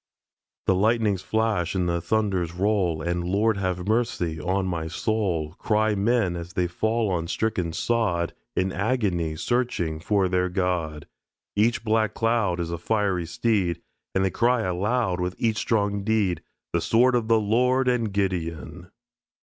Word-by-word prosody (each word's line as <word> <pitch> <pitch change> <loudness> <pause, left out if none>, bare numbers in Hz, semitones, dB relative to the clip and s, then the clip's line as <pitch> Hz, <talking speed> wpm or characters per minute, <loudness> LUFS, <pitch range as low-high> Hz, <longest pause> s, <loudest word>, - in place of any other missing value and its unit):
The - - +4
lightnings 105 -1 +2
flash 110 -6 0
and 90 -2 +1
the 85 0 0
thunders 95 -3 0
roll, 90 -5 +1
And 85 +1 -1
"Lord 100 +4 +1
have 90 -1 -2
mercy 105 -8 0
on 95 +4 0
my 85 -3 -2
soul," 85 -5 -1
Cry 110 0 +2
men 105 -2 +1
as 85 +1 -7
they 90 - +1
fall 110 +5 0
on 85 -2 -1
the - - -9
stricken 110 -7 -1
sod, 90 -4 0 0.2
In 95 +1 +1
agony 95 -8 0
searching 90 -7 -1
for 95 +3 +1
their 90 0 +1
God. 90 -5 -1 0.5
Each 110 +3 +2
black 110 -1 +1
cloud 115 -6 +1
Is 85 -1 -2
a 85 - -3
fiery 95 -3 0
steed. 95 -2 0 0.4
And 95 0 +3
they 95 - 0
cry 120 0 +2
aloud 95 +1 0
With 90 0 -2
each 115 -2 0
strong 100 -3 0
deed, 105 -4 +1 0.3
"The - - +1
sword 125 +3 +4
of 120 -3 +1
the 115 -1 +4
Lord 125 +5 +2
and 120 -4 +1
Gideon." 90 -3 -3
95 Hz, 155 wpm, -25 LUFS, 85-110 Hz, 0.5 s, The